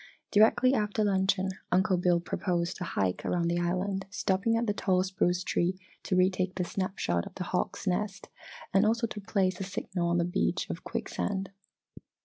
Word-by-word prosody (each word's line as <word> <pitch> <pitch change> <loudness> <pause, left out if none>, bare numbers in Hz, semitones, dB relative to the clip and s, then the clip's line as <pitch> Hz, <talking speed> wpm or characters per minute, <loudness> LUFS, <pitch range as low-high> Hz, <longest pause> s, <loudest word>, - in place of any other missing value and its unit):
Directly 225 +5 +5
after 210 -2 +1
luncheon, 190 -1 +2 0.2
Uncle 190 +2 +3
Bill 175 -1 +3
proposed 175 0 -2
a - - 0
hike 95 - -1
around 170 -1 0
the 170 0 +1
island 190 +3 -1
stopping 200 +3 +1
at 235 - 0
the 205 - +1
tall 185 -2 +1
spruce 185 -1 0
tree 180 +1 0 0.2
to 185 - -1
retake 185 0 +2
the 185 - 0
snap 185 +2 -3
shot 85 0 0
of - - -13
the 185 - -3
hawk's 180 +3 -2
nest 195 +1 -1 0.5
and 195 +1 +5
also 230 +2 +2
to 215 -2 -6
place 190 -3 0
a - - -2
signal 185 -2 -3
on 175 - +2
the 170 - +2
beach 175 - 0
of - - -7
quicksand. 195 -1 -3
190 Hz, 180 wpm, -29 LUFS, 180-200 Hz, 0.5 s, Directly